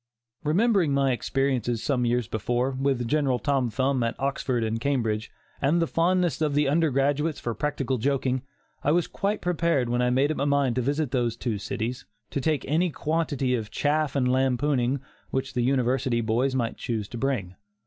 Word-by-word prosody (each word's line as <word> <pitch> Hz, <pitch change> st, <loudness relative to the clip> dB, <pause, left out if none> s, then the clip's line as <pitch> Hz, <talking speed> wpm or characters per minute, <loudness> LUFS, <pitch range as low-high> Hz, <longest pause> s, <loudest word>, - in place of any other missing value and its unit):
Remembering 175 Hz, -1 st, +3 dB
my 135 Hz, -1 st, +3 dB
experiences, 125 Hz, -2 st, 0 dB
some 125 Hz, -4 st, +1 dB
years 120 Hz, -2 st, +1 dB
before, 120 Hz, +4 st, -1 dB
with 130 Hz, -2 st, 0 dB
General 140 Hz, -2 st, +2 dB
Tom 130 Hz, +1 st, 0 dB
Thumb 130 Hz, +2 st, 0 dB
at 115 Hz, +2 st, -2 dB
Oxford 135 Hz, -3 st, -1 dB
and 110 Hz, +1 st, -2 dB
Cambridge, 115 Hz, -6 st, 0 dB, 0.3 s
and 150 Hz, +5 st, +3 dB
the 165 Hz, -, +3 dB
fondness 170 Hz, -2 st, +1 dB
of 150 Hz, -2 st, +1 dB
the 150 Hz, 0 st, +3 dB
undergraduates 145 Hz, 0 st, +1 dB
for 120 Hz, -, -3 dB
practical 135 Hz, +1 st, -1 dB
joking, 130 Hz, 0 st, 0 dB, 0.4 s
I 145 Hz, -, +3 dB
was 175 Hz, 0 st, +2 dB
quite 205 Hz, +2 st, -2 dB
prepared 170 Hz, -7 st, +1 dB
when 120 Hz, +1 st, +1 dB
I 125 Hz, -, +2 dB
made 135 Hz, +4 st, +2 dB
up -, -, -3 dB
my 140 Hz, -, 0 dB
mind 140 Hz, -4 st, +2 dB
to -, -, +2 dB
visit 140 Hz, +2 st, -1 dB
those 120 Hz, -3 st, 0 dB
two 115 Hz, -5 st, -2 dB
cities, 120 Hz, +5 st, -4 dB, 0.3 s
to 140 Hz, -, -2 dB
take 155 Hz, -1 st, 0 dB
any 165 Hz, +6 st, +2 dB
quantity 145 Hz, -4 st, -1 dB
of 110 Hz, -4 st, -2 dB
"chaff" 150 Hz, -1 st, 0 dB
and 130 Hz, -2 st, +2 dB
lampooning 130 Hz, 0 st, +1 dB, 0.3 s
which 135 Hz, 0 st, -2 dB
the 125 Hz, -, 0 dB
University 125 Hz, -1 st, +1 dB
boys 120 Hz, +4 st, +1 dB
might 120 Hz, -3 st, -1 dB
choose 110 Hz, -4 st, -3 dB
to 120 Hz, -, -6 dB
bring. 120 Hz, -9 st, -1 dB
135 Hz, 180 wpm, -26 LUFS, 120-145 Hz, 0.4 s, Remembering